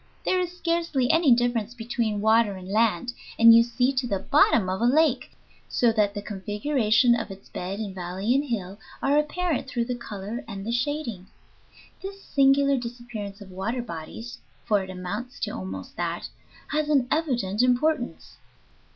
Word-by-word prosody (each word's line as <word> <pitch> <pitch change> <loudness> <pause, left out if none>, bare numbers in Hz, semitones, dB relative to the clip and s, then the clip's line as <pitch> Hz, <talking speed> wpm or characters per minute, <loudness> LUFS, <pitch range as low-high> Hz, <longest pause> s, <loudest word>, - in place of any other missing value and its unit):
There 370 - +2
is 360 0 -3
scarcely 335 -8 +1
any 325 -4 +4
difference 240 -1 +1
between 225 -3 -2
water 220 -1 +3
and 185 -1 -9
land, 220 +2 +1 0.2
and 230 0 +9
you 230 - +8
see 245 +3 0
to 255 -1 -1
the 200 - 0
bottom 230 -4 +3
of 185 +2 -2
a - - +3
lake, 275 0 +3 0.4
so 240 -2 +3
that 210 -2 +1
the 205 - -4
configuration 215 +3 +2
of 225 -2 -2
its 195 0 -11
bed 190 +3 -5
in 205 -3 -4
valley 185 +5 -2
and 275 +2 +2
hill 200 -6 -4 0.2
are 285 +2 +4
apparent 315 -1 -1
through 240 -2 -1
the 250 - -2
color 225 +1 -6
and 195 -2 -7
the 230 - -2
shading. 240 -6 -2 0.7
This 390 0 -8
singular 275 0 +3
disappearance 235 -4 -7
of 195 -2 -11
water 225 +7 -3
bodies, 220 +5 -8 0.3
for 205 -2 +2
it 190 - -9
amounts 200 +8 -6
to - - -1
almost 95 0 -7
that, 170 0 -3 0.4
has 305 0 0
an 275 -5 +3
evident 240 - 0
importance. 250 +2 0
235 Hz, 170 wpm, -25 LUFS, 200-270 Hz, 0.7 s, and